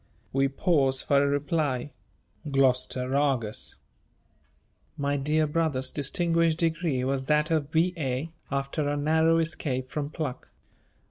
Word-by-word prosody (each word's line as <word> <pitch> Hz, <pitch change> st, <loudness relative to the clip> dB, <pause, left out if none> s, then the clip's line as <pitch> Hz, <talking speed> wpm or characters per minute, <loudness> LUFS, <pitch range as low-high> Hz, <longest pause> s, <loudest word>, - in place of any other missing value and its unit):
We 135 Hz, +1 st, +3 dB
pause 135 Hz, -2 st, +1 dB
for 140 Hz, 0 st, +3 dB
a -, -, +2 dB
reply. 145 Hz, -1 st, -1 dB, 0.6 s
Gloucester 130 Hz, -1 st, +1 dB
Argus." 130 Hz, -7 st, 0 dB, 1.2 s
My 140 Hz, 0 st, 0 dB
dear 150 Hz, +3 st, +1 dB
brother's 150 Hz, -4 st, -1 dB
distinguished 165 Hz, +2 st, +1 dB
degree 165 Hz, -5 st, 0 dB
was 135 Hz, 0 st, -1 dB
that 150 Hz, +2 st, +2 dB
of 155 Hz, -3 st, +1 dB
B.A. 160 Hz, -3 st, 0 dB, 0.2 s
after 140 Hz, +2 st, -1 dB
a 145 Hz, -, -1 dB
narrow 160 Hz, +2 st, +3 dB
escape 140 Hz, -6 st, -2 dB
from 145 Hz, -1 st, -3 dB
pluck. 150 Hz, -5 st, -5 dB
145 Hz, 120 wpm, -27 LUFS, 135-160 Hz, 1.2 s, We